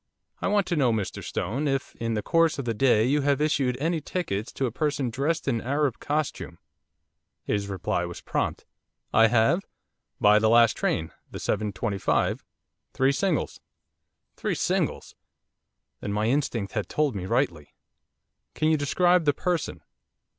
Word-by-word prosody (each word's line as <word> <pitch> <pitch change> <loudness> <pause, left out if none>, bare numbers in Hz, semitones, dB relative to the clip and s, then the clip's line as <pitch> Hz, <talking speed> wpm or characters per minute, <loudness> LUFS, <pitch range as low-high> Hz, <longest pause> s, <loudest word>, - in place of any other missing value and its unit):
'I - - 0
want 200 -1 +2
to 175 - -1
know, 135 -6 +3
Mr 110 -4 -3
Stone, 130 - -2
if, 135 -2 -2
in 115 -1 -2
the 105 - -2
course 165 +2 +2
of 140 - -4
the 115 - 0
day, 115 -2 +3
you 145 +4 +2
have 140 0 +2
issued 140 -5 +1
any 165 +2 0
tickets 115 - -3
to 135 - -1
a 120 - -2
person 140 -2 -1
dressed 145 +7 -1
in 115 -4 +1
Arab 140 0 0
costume?' 150 0 -3 0.9
His 100 -1 -1
reply 90 -2 -2
was 85 0 -7
prompt. - - -2 0.5
'I 115 +1 +6
have 120 - +2 0.5
by 105 0 +6
the 110 0 +3
last 115 -1 +5
train, 80 - -1 0.2
the - - -7
7.25, 105 -1 -1 0.5
three 135 +1 +3
singles.' 175 +2 -1 0.8
Three - - -1
singles! - - -1 0.9
Then 100 - -4
my 105 +1 0
instinct 115 -5 0
had 105 -3 -2
told 150 -6 0
me 95 -2 -4
rightly. 95 - -1 0.8
'Can 155 - +1
you 160 - +3
describe 175 +4 +2
the 145 - +4
person? 175 -4 -2
130 Hz, 155 wpm, -26 LUFS, 110-150 Hz, 0.9 s, I